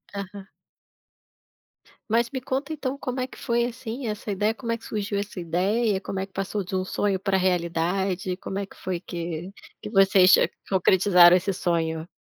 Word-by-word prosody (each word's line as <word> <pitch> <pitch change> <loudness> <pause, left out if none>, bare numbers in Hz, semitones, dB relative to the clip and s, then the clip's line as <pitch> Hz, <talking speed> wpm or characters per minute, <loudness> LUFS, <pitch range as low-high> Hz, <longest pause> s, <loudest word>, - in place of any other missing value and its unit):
Aham. 200 0 -7 1.6
Mas 235 +1 +2
me 260 - -4
conta 275 +4 -3
então, 275 -2 -3
como 260 -2 -4
é 255 - -2
que - - -14
foi, 235 0 0
assim, 245 0 -5
essa 210 0 -4
ideia, 210 +3 +1
como 230 0 -5
é 230 - 0
que 225 - -22
surgiu 205 -1 -3
essa 200 -2 -5
ideia, 190 +5 0
como 195 - -4
é 190 - -2
que 195 - -28
passou 195 +1 -2
de 190 +2 -5
um 185 - 0
sonho 195 +1 -1
para 195 0 +1
realidade, 180 +1 0
como 195 0 -5
é 200 - -3
que - - -18
foi 180 -2 -4
que 170 0 -5 0.3
que - - -6
vocês 195 -3 +6 0.4
concretizaram 180 -2 +6
esse 190 +2 -2
sonho? 165 -2 -1
195 Hz, 180 wpm, -25 LUFS, 180-220 Hz, 1.6 s, vocês